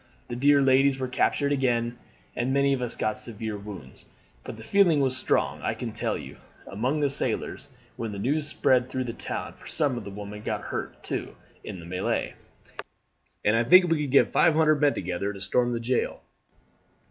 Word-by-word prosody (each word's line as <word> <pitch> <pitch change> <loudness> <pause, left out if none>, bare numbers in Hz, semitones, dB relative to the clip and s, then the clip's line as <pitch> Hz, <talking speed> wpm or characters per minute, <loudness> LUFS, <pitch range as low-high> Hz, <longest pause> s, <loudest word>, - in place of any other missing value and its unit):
The 120 - -4
dear 140 +2 +4
ladies 135 +1 +4
were 130 -1 -2
captured 140 +3 +1
again, 120 -3 0 0.4
and 125 +2 -1
many 140 0 +3
of 130 - -2
us 120 -2 -3
got 110 - -2
severe 110 -2 -5
wounds. 100 -10 -10 0.4
But - - -8
the 110 - -10
feeling 175 - +4
was 130 -2 +1
strong, - - 0
I - - -1
can - - -5
tell - - -2
you, - - -10 0.3
among 125 +9 -1
the 145 - +3
sailors 140 - -2 0.3
when 115 -2 -4
the 100 - -6
news 145 +8 0
spread 130 -4 +2
through 130 0 -2
the 120 -2 -5
town, - - -5
for - - -15
some 140 -6 +1
of - - -9
the 100 - -7
women 105 +1 -8
got - - -3
hurt, - - -5
too, - - -4 0.3
in 95 - -7
the 85 - -10
melee, 90 +2 -2 1.1
and 105 - +4
I 115 - +3
think 180 +10 +7
we 160 -2 +2
could 145 -3 -3
get 140 - +5
five 160 - +4
hundred 155 -2 +3
men 145 -1 +4
together 90 +3 -3
to 100 - -9
storm 120 +5 +1
the 120 - -1
jail." 120 +2 -1
125 Hz, 200 wpm, -26 LUFS, 110-140 Hz, 1.1 s, think